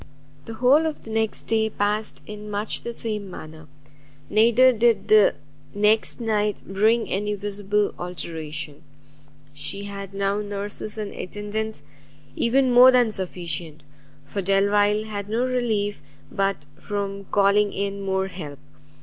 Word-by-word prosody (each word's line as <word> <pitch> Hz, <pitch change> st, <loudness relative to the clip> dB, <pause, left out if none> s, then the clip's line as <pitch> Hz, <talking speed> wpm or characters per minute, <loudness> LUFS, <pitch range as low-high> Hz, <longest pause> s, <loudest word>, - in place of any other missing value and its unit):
The 225 Hz, -, -7 dB
whole 270 Hz, +7 st, +4 dB
of 310 Hz, -, -5 dB
the 225 Hz, -, -9 dB
next 220 Hz, -1 st, -1 dB
day 220 Hz, -1 st, +1 dB
passed 210 Hz, +1 st, -1 dB
in 210 Hz, 0 st, -8 dB
much 205 Hz, +1 st, -1 dB
the 235 Hz, -, -4 dB
same 215 Hz, -4 st, -4 dB
manner, 155 Hz, -3 st, -10 dB, 0.6 s
neither 235 Hz, +4 st, +5 dB
did 230 Hz, -3 st, +2 dB
the 215 Hz, -1 st, +6 dB, 0.4 s
next 210 Hz, +3 st, +3 dB
night 210 Hz, -3 st, 0 dB
bring 220 Hz, +4 st, +2 dB
any 205 Hz, +2 st, -1 dB
visible 205 Hz, 0 st, -1 dB
alteration. 155 Hz, -4 st, -5 dB, 0.7 s
She 195 Hz, +7 st, -5 dB
had 200 Hz, -1 st, -7 dB
now 200 Hz, +1 st, 0 dB
nurses 205 Hz, +1 st, -5 dB
and 210 Hz, -2 st, -4 dB
attendants 210 Hz, -1 st, -4 dB, 0.5 s
even 255 Hz, +2 st, +2 dB
more 250 Hz, +1 st, +9 dB
than 245 Hz, -3 st, +4 dB
sufficient, 170 Hz, -6 st, -5 dB, 0.4 s
for 200 Hz, +7 st, -3 dB
Delvile 205 Hz, +2 st, +3 dB
had 205 Hz, -2 st, -6 dB
no 235 Hz, +3 st, +1 dB
relief 225 Hz, -5 st, -1 dB, 0.3 s
but 195 Hz, -6 st, -1 dB
from 200 Hz, -1 st, -4 dB
calling 200 Hz, +1 st, +3 dB
in 200 Hz, 0 st, -3 dB
more 190 Hz, -1 st, 0 dB
help. 170 Hz, -7 st, -8 dB
205 Hz, 130 wpm, -24 LUFS, 195-220 Hz, 0.7 s, more